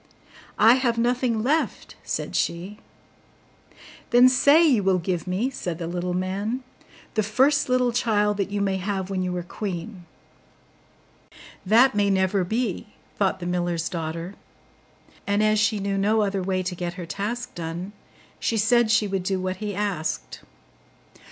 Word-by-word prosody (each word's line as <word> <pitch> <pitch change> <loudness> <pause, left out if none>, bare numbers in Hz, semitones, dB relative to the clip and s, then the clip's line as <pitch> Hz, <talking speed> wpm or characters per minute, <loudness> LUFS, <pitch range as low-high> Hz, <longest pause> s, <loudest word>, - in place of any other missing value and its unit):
'I 225 +2 +7
have 235 -3 +1
nothing 240 -1 +1
left,' 305 +6 -1
said - - -4
she. 185 +5 -2 1.3
'Then 245 +1 +7
say 285 +6 +5
you 250 -8 +3
will 190 -1 +2
give 180 0 -3
me,' 205 +9 -1
said 175 -10 -4
the 170 - -5
little 175 +1 -3
man, 200 +7 -2 0.5
'the 215 - +1
first 265 +8 +2
little 250 -1 +2
child 210 -4 +1
that 200 -1 -1
you 205 0 -2
may 195 -1 0
have 190 0 -3
when 190 -1 -1
you 180 -1 -2
are 175 - -3
queen.' 185 0 -6 1.6
'That 240 +6 +5
may 205 -1 +2
never 190 0 +2
be,' 220 +1 -2 0.3
thought 195 -2 +1
the 175 - -6
miller's 175 -2 -1
daughter: 165 +1 -5 0.9
and 205 +1 +2
as 215 0 +3
she 215 +1 +2
knew 200 0 -2
no 215 +2 +2
other 195 -1 -1
way 185 0 -1
to 185 0 -3
get 175 -1 -4
her 180 -2 -6
task 215 +8 -4
done, 170 +3 -5 0.5
she 225 - 0
said 230 +2 +3
she 220 -1 +3
would 195 -1 -2
do 190 +1 -1
what 185 0 -3
he 210 -1 -4
asked. 165 - -3
200 Hz, 160 wpm, -24 LUFS, 180-225 Hz, 1.6 s, I